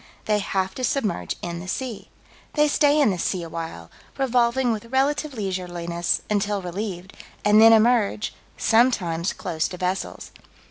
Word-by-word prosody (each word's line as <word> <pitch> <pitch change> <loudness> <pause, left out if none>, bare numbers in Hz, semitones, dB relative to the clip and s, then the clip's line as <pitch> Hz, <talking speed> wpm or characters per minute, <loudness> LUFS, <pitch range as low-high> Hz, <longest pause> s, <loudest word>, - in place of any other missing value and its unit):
They 210 -1 +2
have 190 -1 -1
to 255 - -6
submerge 210 - -1
in 170 -1 -4
the 180 - -8
sea. 230 0 -5 0.5
They 300 0 +4
stay 290 0 +3
in 275 -8 +4
the 180 - -3
sea 180 0 -1
awhile, 165 - -7 0.3
revolving 250 -1 +2
with 220 0 -3
relative 275 +3 0
leisureliness, 175 -4 -2
until 205 -1 0
relieved, 185 0 -5 0.3
and 210 +1 +6
then 225 0 +9
emerge, 220 -2 +3 0.2
sometimes 200 -8 +2
close 165 -4 -2
to 180 - -8
vessels. 185 +1 -3
205 Hz, 145 wpm, -24 LUFS, 175-240 Hz, 0.5 s, then